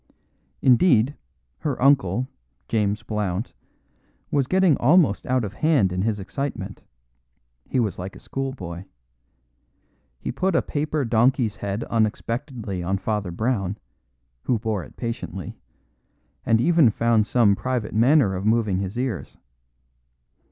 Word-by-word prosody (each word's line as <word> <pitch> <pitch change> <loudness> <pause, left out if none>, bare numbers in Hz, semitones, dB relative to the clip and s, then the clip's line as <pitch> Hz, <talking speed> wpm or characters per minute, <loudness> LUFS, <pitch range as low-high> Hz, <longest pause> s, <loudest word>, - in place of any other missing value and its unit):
Indeed, 130 -1 +4 0.4
her 145 -4 -2
uncle, 130 -4 +3 0.4
James 105 -2 0
Blount, 105 0 -3 0.8
was 140 -3 +1
getting 185 -3 +4
almost 150 - +3
out 130 -1 +1
of 105 - -4
hand 145 - +2
in 90 - -1
his 105 0 0
excitement; 140 +8 -5 0.9
he 130 - +1
was 105 -7 -1
like 95 +2 -6
a - - -11
schoolboy. 95 -11 -5 1.3
He - - -4
put 185 +7 0
a - - +3
paper 150 -1 -1
donkey's 115 -1 +2
head 100 +3 -3
unexpectedly 115 - -2
on 95 +3 -1
Father 105 -1 -2
Brown, 100 +1 -1 0.7
who 125 - +2
bore 105 -4 -2
it - - -15
patiently, 115 - -5 0.9
and 110 - +4
even 165 -1 +5
found 110 -1 +2
some 115 -6 +4
private 125 -1 -3
manner 120 -1 +4
of 95 +1 -3
moving 110 -3 +2
his 100 +3 -4
ears. 125 -6 -3
115 Hz, 125 wpm, -24 LUFS, 100-130 Hz, 1.3 s, even